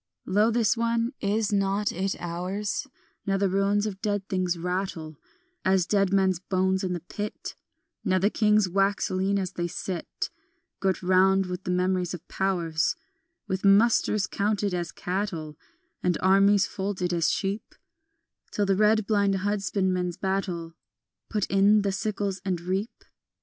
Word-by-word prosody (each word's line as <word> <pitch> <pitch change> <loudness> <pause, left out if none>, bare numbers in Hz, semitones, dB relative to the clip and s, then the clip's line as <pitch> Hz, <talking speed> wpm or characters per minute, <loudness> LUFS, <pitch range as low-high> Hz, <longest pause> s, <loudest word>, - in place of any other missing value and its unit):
Lo, 210 +4 +3
this 235 +1 +2
one, 230 +1 0
is 210 +1 0
not 200 +1 +1
it 190 +2 -2
ours, 185 +7 -3 0.4
Now 195 0 +2
the 200 0 +2
ruins 200 +2 +2
of 195 -2 -5
dead 205 -2 -1
things 185 -3 0
rattle 175 -3 -3 0.5
As 190 -2 +3
dead 195 -1 +2
men's 190 -3 +2
bones 190 0 0
in 185 -1 -1
the 175 - -4
pit, 205 +4 -6 0.5
Now 185 - +2
the 200 +3 +2
kings 210 -2 +3
wax 195 +2 +1
lean 190 +2 +1
as 185 -2 -2
they 175 0 -3
sit 180 0 -5 0.5
Girt 190 -1 0
round 190 +1 +4
with 180 0 -6
memories 180 0 0
of 175 0 -13
powers, 170 -5 0 0.5
With 190 0 -2
musters 205 0 +4
counted 200 +1 -1
as 175 -2 -2
cattle 175 -5 -3 0.5
And 180 -1 +1
armies 195 +1 +4
folded 190 -3 -3
as 170 -2 +2
sheep 195 +2 -3 0.7
Till 205 - 0
the 195 0 +2
red 215 +1 +3
blind 200 -2 +2
husbandman 190 -2 0
battle 185 -4 -2 0.6
Put 210 -3 0
in 200 +2 +4
the 200 - +1
sickles 200 -1 -2
and 185 -3 -1
reap? 190 +6 -3
195 Hz, 145 wpm, -26 LUFS, 180-205 Hz, 0.7 s, round